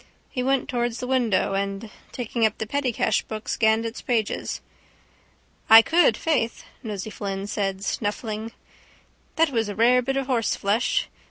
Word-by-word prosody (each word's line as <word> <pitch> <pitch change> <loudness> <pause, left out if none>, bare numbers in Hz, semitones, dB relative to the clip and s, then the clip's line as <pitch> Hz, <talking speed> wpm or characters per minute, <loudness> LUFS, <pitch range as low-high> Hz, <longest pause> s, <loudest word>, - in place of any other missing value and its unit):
He 250 - -2
went 270 +1 +1
towards 240 -3 -2
the - - -4
window 240 -7 +1
and, 195 +2 -3 0.2
taking 235 -1 -3
up 220 -1 +2
the 220 - -3
pettycash 255 0 0
book, 215 0 -6
scanned 220 0 +2
its 230 +1 -5
pages. 225 -4 -1 1.1
—I 225 +1 +10
could, 345 +6 +3
faith, 270 -8 -1 0.2
Nosey 215 -2 -5
Flynn 195 -1 -4
said, 195 -1 -2
snuffling. 215 +2 -3 0.8
That 325 -2 +3
was 225 -4 0
a 205 - -5
rare 245 +4 +4
bit 270 +2 -2
of 270 - -1
horseflesh. 235 - 0
225 Hz, 150 wpm, -24 LUFS, 210-250 Hz, 1.1 s, I